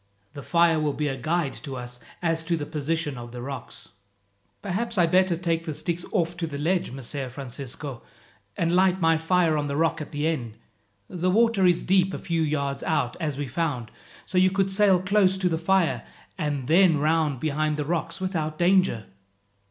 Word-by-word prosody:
The 145 - -7
fire 170 +1 +3
will 150 -2 0
be 150 +1 -1
a 135 - -2
guide 155 +2 -1
to 140 -4 -6
us 125 -1 -7 0.2
as 165 -1 0
to 170 0 0
the 145 - -4
position 150 -2 -2
of 120 0 -9
the 125 - -7
rocks." 135 0 -8 0.7
"Perhaps 210 +4 -2
I - - +5
had 165 -1 +2
better 185 -1 +4
take 165 -1 -1
the 155 -3 -4
sticks 175 +2 -3
off 175 -4 0
to 165 -1 -2
the 140 -2 -5
ledge, 170 +5 0
Messer 135 +1 -5
Francisco, 135 0 -7 0.6
and 170 +1 +1
light 185 0 +3
my 165 -1 +4
fire 165 0 +2
on 145 -1 -1
the 140 0 -2
rock 165 0 +1
at 150 - -7
the 145 +1 -2
end. 120 -9 -3 0.5
The 180 +1 -1
water 215 -1 +4
is 175 -1 +2
deep 190 0 +2
a - - -3
few 165 -1 -2
yards 140 -3 -1
out, 155 -7 0
as 150 -5 -2
we 145 -1 -3
found, 130 -5 -2 0.3
so 185 - 0
you 185 0 +5
could 195 0 0
sail 195 -2 +4
close 190 0 +3
to 185 -1 +1
the 160 -1 -1
fire 185 0 +2 0.3
and 145 -4 -2
then 170 0 +5
round 155 -2 +1
behind 155 +1 0
the 150 - -2
rocks 165 +2 -2
without 160 -5 -2
danger." 180 - +3
165 Hz, 200 wpm, -25 LUFS, 145-180 Hz, 0.7 s, I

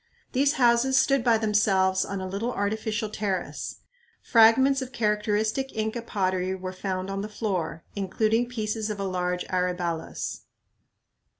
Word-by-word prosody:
These 280 +2 +2
houses 250 0 +3
stood 275 -2 +3
by 235 -2 +4
themselves 195 -3 +2
on 200 0 -4
a 185 - -4
little 200 +6 -2
artificial 215 +1 -2
terrace. 200 -3 -4 0.4
Fragments 260 +4 +5
of 260 -1 -6
characteristic 215 +3 0
Inca 220 +2 -1
pottery 185 -4 -1
were 185 0 -6
found 185 0 -3
on 195 0 -2
the 210 - -5
floor, 185 -7 -3
including 220 +4 0
pieces 220 -2 -2
of 210 -1 -4
a - - -1
large 180 -1 -1
aryballus. 180 -3 -2
210 Hz, 135 wpm, -26 LUFS, 190-230 Hz, 0.4 s, Fragments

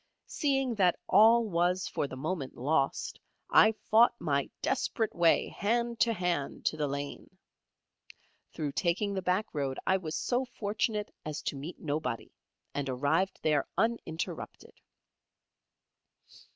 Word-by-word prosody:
Seeing 270 -4 0
that 180 -2 +4
all 225 +4 +6
was 180 -1 +1
for 145 - -2
the 130 - -8
moment 145 0 -4
lost, 140 +1 0 0.3
I 215 - +7 0.2
fought 230 +3 +6
my 140 -4 0
desperate 225 -4 0
way 170 -1 +3
hand 235 +2 -1
to 235 - +4
hand 175 -8 -2
to - - +2
the 150 -1 0
lane. 140 +1 -6 1.1
Through 150 -2 -3
taking 190 +6 0
the 190 - -2
back 185 +4 +1
road, 140 -3 -2
I 190 - +3
was 160 -4 -5
so 250 +1 0
fortunate 215 -3 -2
as 155 -1 -5
to - - -2
meet 145 +6 -7
nobody, 150 -6 -3 0.4
and 140 -1 -2
arrived 155 +9 +1
there 150 -3 +2
uninterrupted. 225 -8 -3
180 Hz, 130 wpm, -30 LUFS, 145-220 Hz, 1.1 s, I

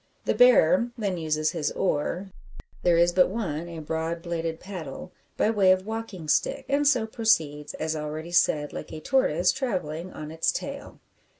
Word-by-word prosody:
The - - +2
bearer 275 - +5
then 200 -5 -2
uses 155 -1 0
his 155 -4 -2
oar 180 +3 -1 0.5
there 175 -1 +3
is 170 +1 +4
but 180 0 +4
one, 175 -6 -3
a 170 - -8
broad 160 +2 -3
bladed 165 -2 -3
paddle 180 -4 -8 0.3
by 215 - +2
way 195 -4 +4
of 185 0 +2
walking 220 -7 -6
stick; - - +1
and 285 +1 +2
so 250 -6 +3
proceeds, 155 -11 0
as 160 0 -2
already 155 +2 -5
said, 150 -3 +2
like - - -7
a - - -6
tortoise 180 - +2
travelling 180 - -3
on 155 0 -8
its 160 0 +1
tail! - - -6
170 Hz, 170 wpm, -26 LUFS, 155-205 Hz, 0.5 s, bearer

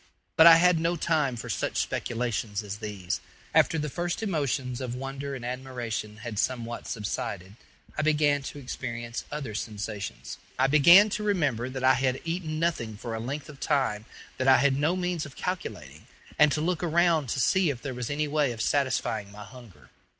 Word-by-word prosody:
But 160 - +8
I 165 - +11
had 175 0 +4
no 165 +2 +1
time 155 -6 +1
for 115 - -7
such - - -2
speculations 115 -3 -2
as 105 0 -5
these. 105 -4 -4 0.3
After 165 - +4
the 150 -1 -1
first 175 +8 -3
emotions 140 - -1
of 125 -1 -4
wonder 135 +1 -5
and 120 -2 -7
admiration 120 -4 -4
had 110 -3 -4
somewhat 120 -2 -2
subsided, 100 -2 -4 0.4
I - - 0
began 150 -2 +2
to 140 - -7
experience 120 -3 -5
other 140 -7 -4
sensations. 105 -1 -5 0.2
I 130 - +3
began 170 +9 +7
to 210 - -2
remember 145 - 0
that 130 0 -5
I 130 0 +6
had 130 -1 0
eaten 165 -2 -3
nothing 120 -11 -1
for 115 +2 -6
a 110 - -3
length 140 +6 -5
of 145 -3 -12
time 130 -8 0 0.3
that 130 - 0
I 130 - +8
had 140 -1 +3
no 150 +6 +1
means 180 -4 -2
of 135 - -15
calculating, 90 - -5 0.3
and 150 -1 +6
to 150 - -1
look 175 +1 0
around 170 -4 +2
to 135 - -1
see 180 +7 +3
if 135 -4 -3
there 135 -2 -4
was 125 -1 -4
any 150 +1 -1
way 145 -3 +1
of 110 - -6
satisfying 130 -7 0
my 105 +1 -10
hunger. 120 -2 -15
135 Hz, 185 wpm, -27 LUFS, 115-155 Hz, 0.4 s, I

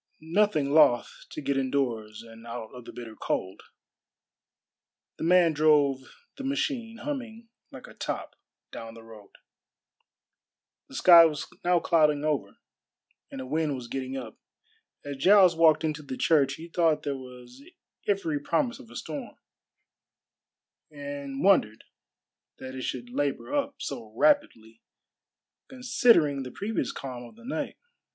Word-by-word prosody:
Nothing 190 -9 +2
loth 145 -6 +3
to - - -7
get 140 -1 -1
indoors 115 -5 -2
and 115 0 -14
out 115 -2 -7
of 125 -2 -11
the - - -9
bitter 115 -2 -9
cold, 95 -2 -3 1.6
the - - -6
man 170 -1 +4
drove 145 -3 +2 0.3
the 275 - -7
machine, 265 -4 -2
humming 235 -6 -6 0.2
like - - -11
a - - -13
top, - - -5 0.4
down 115 0 -8
the 115 - -12
road. 110 -3 -14 1.6
The - - -13
sky 170 -2 +8
was 150 -3 -1 0.2
now 175 0 +3
clouding 150 -4 +2
over, 145 -10 -2 0.7
and 135 - -7
a - - -6
wind 150 +1 -1
was 125 -2 -8
getting 135 +1 -4
up. 120 -4 -8 0.7
As 140 -1 -5
Giles 185 +3 +6
walked 160 -1 +4
into 155 -1 -2
the 135 -3 -7
church 140 -4 +3
he 165 +3 -10
thought 165 -2 +1
there 145 -2 -2
was 125 0 -12 0.5
every 180 -7 0
promise 245 - -1
of 250 -4 -14
a - - -14
storm, 275 -4 -6 1.5
and 140 -2 -6
wondered 110 - +3 0.7
that 130 0 -8
it 130 - -6
should 120 -1 -5
labor 145 - -2
up 285 -1 -1
so 110 -2 -6
rapidly 115 - +1 0.9
considering 245 - +3
the 130 - -6
previous 210 - -3
calm 125 -3 -7
of 120 - -13
the 235 +1 -16
night. 270 - -4
145 Hz, 140 wpm, -27 LUFS, 125-180 Hz, 1.6 s, sky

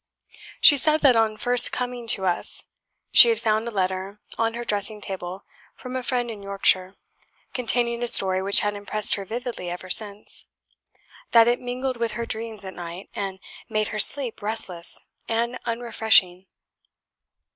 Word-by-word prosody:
She 290 - +7
said 310 +3 +2
that 270 -4 +4
on 220 -1 0
first 245 +2 +4
coming 245 -1 -5
to 195 -4 +3
us, 175 -1 +1 0.5
she 475 - +7
had 455 - +1
found 220 0 -1
a - - -3
letter 190 0 -4 0.2
on 225 0 -2
her 240 - -5
dressing 210 -1 -1
table 190 -1 -8 0.3
from 255 0 -9
a 255 - -3
friend 245 -2 -3
in 210 -2 -10
Yorkshire, 195 -1 0 0.6
containing 240 -1 +2
a 240 - -2
story 190 -4 +5
which 200 +1 +3
had 205 0 -2
impressed 205 +1 0
her 200 - -3
vividly 235 -4 -6
ever 180 +1 -8
since; 205 +1 -1 0.9
that 230 -1 +6
it 240 0 0
mingled 250 +1 -4
with 230 -1 -3
her 235 +1 -5
dreams 220 -2 -2
at 190 - -8
night, 175 +2 -10
and 195 -2 -5 0.3
made 215 0 -2
her 215 - -5
sleep 255 +1 +4
restless 200 -5 -2 0.3
and 235 +2 -2
unrefreshing. 220 -6 +1
220 Hz, 160 wpm, -23 LUFS, 195-240 Hz, 0.9 s, She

